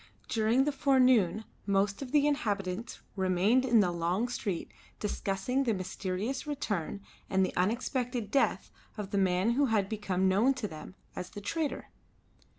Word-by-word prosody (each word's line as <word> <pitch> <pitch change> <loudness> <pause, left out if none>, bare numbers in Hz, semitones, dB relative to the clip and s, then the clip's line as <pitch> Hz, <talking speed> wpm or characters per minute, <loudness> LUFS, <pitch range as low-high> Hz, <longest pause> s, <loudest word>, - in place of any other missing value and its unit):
During 225 +4 +2
the 295 - +1
forenoon 250 -8 +3 0.2
most 200 +2 +1
of 260 -2 -6
the 295 -1 +4
inhabitants 210 -6 -2
remained 190 +6 +3
in 235 -4 +5
the 180 -3 +1
long 175 +7 0
street 200 -8 -3 0.3
discussing 210 +6 -1
the 230 -5 +1
mysterious 190 - -3
return 205 - -3 0.3
and 190 0 +3
the - - -5
unexpected 235 +3 -1
death 275 - +1 0.3
of 200 -2 -5
the 200 - +1
man 190 +3 +2
who 275 +3 +2
had 215 -4 +1
become 195 -3 0
known 220 +9 +3
to 250 -5 -3
them 160 +1 -10 0.2
as 180 - -5
the - - -8
trader. 295 +9 -3
210 Hz, 155 wpm, -30 LUFS, 190-255 Hz, 0.3 s, in